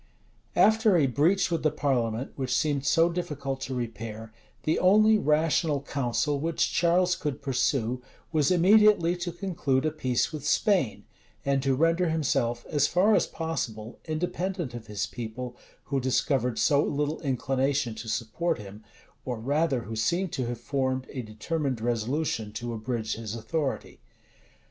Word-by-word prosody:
vol. - - -33
vii - - -36
p. - - -37
300 - - +7
After 220 -4 +3
a 150 - +4
breach 165 - +2
with 165 - 0
the 155 - +3
parliament, 130 -5 -1
which 130 -2 -1
seemed 145 -1 0
so 165 +1 +4
difficult 150 -6 -4
to 130 0 -4
repair, 115 -2 -6 0.3
the 155 - +1
only 215 +3 +5
rational 155 -1 +2
counsel 140 +1 -1
which 160 +2 0
Charles 180 +1 +3
could 150 -6 -3
pursue, 125 -2 0 0.3
was 150 -3 +2
immediately 185 -1 +5
to 175 0 -3
conclude 160 -7 -1
a 155 - +1
peace 130 -4 -1
with 150 -3 -5
Spain, 185 - +1 0.4
and 140 -1 +2
to 135 0 +1
render 165 +4 +2
himself, 120 -6 0
as 145 -1 +2
far 195 +7 +3
as - - +3
possible, 120 -9 -4
independent 175 -1 -3
of 120 -2 -8
his 105 -1 -2
people, 120 +1 -6 0.3
who 140 -1 -1
discovered 125 -1 +1
so 145 -2 +3
little 150 +2 -1
inclination 135 -2 0
to 110 +1 -7
support 160 +11 -1
him, 105 0 -10 0.4
or 125 -3 -4
rather 140 +2 +1
who 115 -1 -6
seemed 170 - 0
to 130 -3 -2
have 120 -1 -4
formed 130 0 -1
a 130 - -4
determined 125 +4 -3
resolution 115 0 -1
to 120 +2 -5
abridge 110 0 -3
his 110 -1 -5
authority. 140 +5 -3
140 Hz, 160 wpm, -27 LUFS, 120-165 Hz, 0.4 s, 300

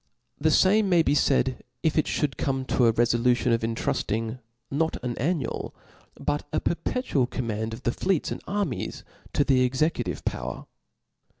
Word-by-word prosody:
The 160 +2 +3
fam^ 200 +6 +5
may 175 -4 +4
be 145 - +2
faid, 130 -3 +2 0.2
if 160 - +2
it 155 - +2
(hould 140 -4 0
come 135 +1 -1
to 125 -2 +3
a - - +6
refolution 120 +1 +2
of 115 - +1
intrulling, 115 +1 -1 0.3
not 160 +3 0
an 120 -2 -2
annual, 155 +3 -2 0.4
but 145 0 0
a - - +1
perpetual 170 - 0
command, 110 -3 -3
of 115 +2 -8
the 120 - +2
fleets 185 +5 0
9ad - - -4
armies 200 - -2 0.3
to - - +3
the 135 -2 +3
executive 130 +6 0
power. - - -3
130 Hz, 160 wpm, -26 LUFS, 120-160 Hz, 0.4 s, a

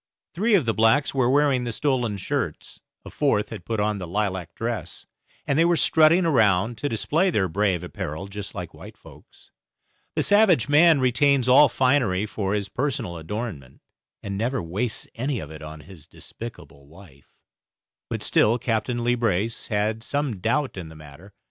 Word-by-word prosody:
Three 215 +5 +2
of 170 -9 +2
the 115 - +1
blacks 115 +7 +2
were 130 -3 +2
wearing 140 -2 +2
the 120 - -3
stolen 125 -4 -1
shirts, 95 - -4 0.3
a - - -9
fourth 135 -8 0
had 85 - -9
put 115 -2 -2
on 105 0 0
the 90 - -6
lilac 95 -2 -3
dress, 115 0 -5 0.4
and 140 +2 0
they - - +6
were 170 0 +3
strutting 160 +4 +4
around 110 - +2
to 145 - -2
display 160 - +1
their 100 - +1
brave 95 -1 0
apparel 85 0 -6
just 100 0 -8
like - - -6
white - - -12
folks. - - -18 0.6
The - - +1
savage 205 - +4
man 155 0 +5
retains 130 +1 +2
all 135 +3 +7
finery 125 -7 +1
for 100 -1 -2
his 100 -2 -2
own - - -29
personal 125 -10 -2
adornment, 80 - -6 0.4
and 100 0 -4
never 125 +4 -1
wastes 105 +6 -3
any 130 +3 -2
of 80 -7 -7
it 80 -1 -10
on 75 0 -9
his 80 -3 -15
despicable 80 -11 -11
wife, 80 -4 -18 0.7
but - - -4
still 115 +3 +3
Captain 120 0 -2
Leebrace 115 -3 0
had 105 +1 -1
some 140 -4 -3
doubt 130 +4 -1
in 85 -4 -7
the 80 - -13
matter. 75 +6 -14
110 Hz, 175 wpm, -24 LUFS, 95-135 Hz, 0.7 s, all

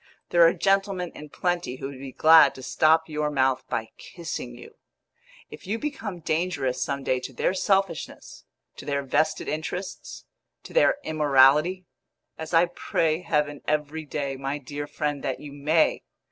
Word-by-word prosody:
There 175 - +3
are - - +4
gentlemen 195 -2 0
in 150 - -10
plenty 175 -5 -2
who 135 - -6
would 135 -2 -10
be 135 0 -8
glad 160 +4 +6
to 130 - -10
stop 160 +4 +3
your 150 -1 -2
mouth 130 -2 +1
by 110 -1 -3
kissing 160 - -7
you! - - -13 0.8
If - - -11
you 215 +3 -1
become 225 - -5
dangerous 155 -6 -1
some 140 +2 -2
day 130 -1 0
to 125 - -7
their 130 - 0
selfishness, 195 -3 -1 0.3
to - - -10
their 140 -1 -1
vested 155 +4 0
interests, 180 +5 -5 0.4
to - - -12
their - - +4
immorality 150 - +3 0.5
as 160 0 -7
I 170 0 +5
pray 165 -1 -1
heaven 150 -4 -1
every 150 +1 -1
day, 140 -2 -4
my 135 +2 -3
dear 145 +1 -6
friend, 145 -2 -3
that - - -2
you 145 -1 -10
may! 155 +3 +2
150 Hz, 160 wpm, -25 LUFS, 140-175 Hz, 0.8 s, glad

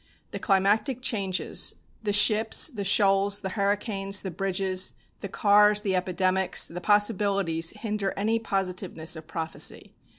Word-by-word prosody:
The - - -6
climatic 215 +6 +1
changes, 195 -6 0 0.3
the 210 -2 -2
ships, 215 +7 +4
the 210 -6 -5
shoals, 200 0 +3
the 190 - -4
hurricanes, 200 0 -1
the 190 - -5
bridges, 190 +1 -1 0.3
the 200 - -7
cars, 210 +1 +3
the 195 -3 -1
epidemics, 185 +1 0
the 180 +1 -7
possibilities 200 -5 +1
hinder 210 -3 -3
any 220 +3 0
positiveness 185 -5 -3
of 160 0 -11
prophecy. 160 0 -4
195 Hz, 130 wpm, -26 LUFS, 185-210 Hz, 0.3 s, ships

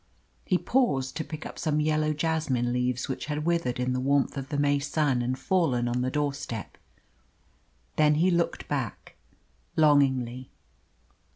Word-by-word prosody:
He 185 - +2
paused 155 - +1
to 160 - -2
pick 155 +1 -8
up - - -8
some 150 -1 0
yellow 155 0 +1
jasmine 150 -6 0
leaves 125 0 -1
which 135 +1 -4
had 150 0 -2
withered 165 -8 0
in 125 0 0
the 125 - -1
warmth 140 +1 +1
of 135 -1 -5
the 145 - -2
May 145 0 +2
sun 145 -3 0
and 125 +2 -1
fallen 135 -11 +1
on 120 +1 0
the 130 - 0
doorstep. 140 - -3 1.2
Then 150 -1 +5
he 175 +5 +3
looked 170 -1 0
back 135 -7 -4 0.6
longingly. 130 -5 +2
145 Hz, 155 wpm, -27 LUFS, 125-155 Hz, 1.2 s, Then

